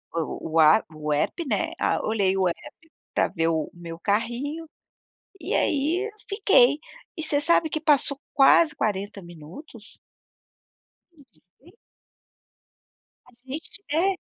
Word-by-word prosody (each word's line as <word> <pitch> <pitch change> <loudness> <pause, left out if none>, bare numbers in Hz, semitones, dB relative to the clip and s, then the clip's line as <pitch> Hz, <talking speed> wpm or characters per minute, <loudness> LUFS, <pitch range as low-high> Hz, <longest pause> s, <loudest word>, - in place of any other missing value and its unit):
eh, - - 0
o 160 0 -5
o - - +4
a 155 +6 +6
o 150 -1 -3
app, 325 - -1
né, 210 -5 -1
a - - 0
olhei 200 -3 +1
o 190 -1 +2
app 320 - -10 0.2
pra - - +2
ver 165 0 -1
o 160 -2 -1
meu 170 -1 -9
carrinho 240 - -2 0.7
e - - -3
aí, 330 +9 0 0.2
fiquei. 305 - +4 0.4
E 320 - -4
você 290 -1 +2
sabe 330 +1 +3
que 310 0 -3
passou 290 -2 +2
quase 300 +3 +5
40 205 -4 -3
minutos. 175 - -13 1.1
A - - -32
gente 230 - -23 0.2
vê 330 +6 -19 1.6
A 250 - -19
gente 300 +9 -8
é. 365 +5 +1
250 Hz, 140 wpm, -25 LUFS, -, 1.6 s, a